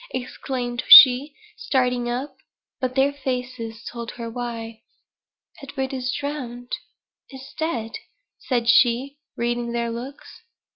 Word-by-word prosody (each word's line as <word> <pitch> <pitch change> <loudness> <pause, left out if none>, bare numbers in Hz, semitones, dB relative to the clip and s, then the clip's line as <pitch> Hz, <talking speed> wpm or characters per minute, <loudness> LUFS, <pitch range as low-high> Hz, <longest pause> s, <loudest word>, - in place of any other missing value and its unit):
exclaimed 245 -1 -4
she, 265 +3 +9 0.2
starting 250 -2 -1
up. 260 +3 -4 0.4
But 255 -1 -3
their 275 +1 +2
faces 250 -4 -5
told 235 -1 -7
her 230 -1 -7
why. 230 -2 -6 0.8
"Edward 270 -1 -5
is 255 -1 -2
drowned 250 -5 -6 0.6
is 265 -1 -12
dead," 240 -9 -3 0.5
said 240 -3 -2
she, 260 +4 +3 0.2
reading 240 0 -2
their 235 0 -2
looks. 250 +5 -9
250 Hz, 110 wpm, -23 LUFS, 235-265 Hz, 0.8 s, she